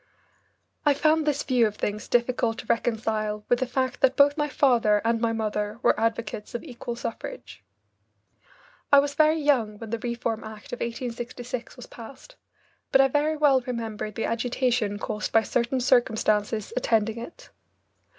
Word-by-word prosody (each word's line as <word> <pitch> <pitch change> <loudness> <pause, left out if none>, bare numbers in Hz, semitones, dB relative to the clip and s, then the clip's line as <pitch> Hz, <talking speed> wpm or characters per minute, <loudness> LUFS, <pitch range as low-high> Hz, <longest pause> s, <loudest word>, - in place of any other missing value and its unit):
I 290 -2 +4
found 310 +1 +2
this 290 -1 +1
view 250 -4 +3
of 210 - -6
things 210 0 -3
difficult 240 -1 +1
to - - -7
reconcile 215 -2 -1
with 245 - +3
the 260 - -1
fact 260 0 -2
that 265 0 +4
both 285 0 +5
my 295 -1 -1
father 235 -7 +3
and 230 0 +1
my 230 -1 +1
mother 210 -1 -2
were - - +3
advocates 225 -1 -2
of 240 - -4
equal 240 -5 -6
suffrage. 235 - -7 1.3
I 285 - +8
was 280 0 +3
very 310 +2 +3
young 245 -8 +1
when 220 0 -9
the 230 - -2
Reform 235 -1 -2
Act 220 +5 -10
of 245 - -4
1866 240 0 -5
was 250 - -10
passed, 270 - -12 0.6
but 270 - +5
I 270 0 +5
very 300 +3 +1
well 280 -3 +4
remember 230 -4 -4
the 215 +2 -4
agitation 235 -2 0
caused 210 +1 -4
by 225 - +4
certain 245 +4 0
circumstances 220 -4 +1
attending 225 -2 +1
it. 235 - -11
235 Hz, 160 wpm, -26 LUFS, 220-265 Hz, 1.3 s, I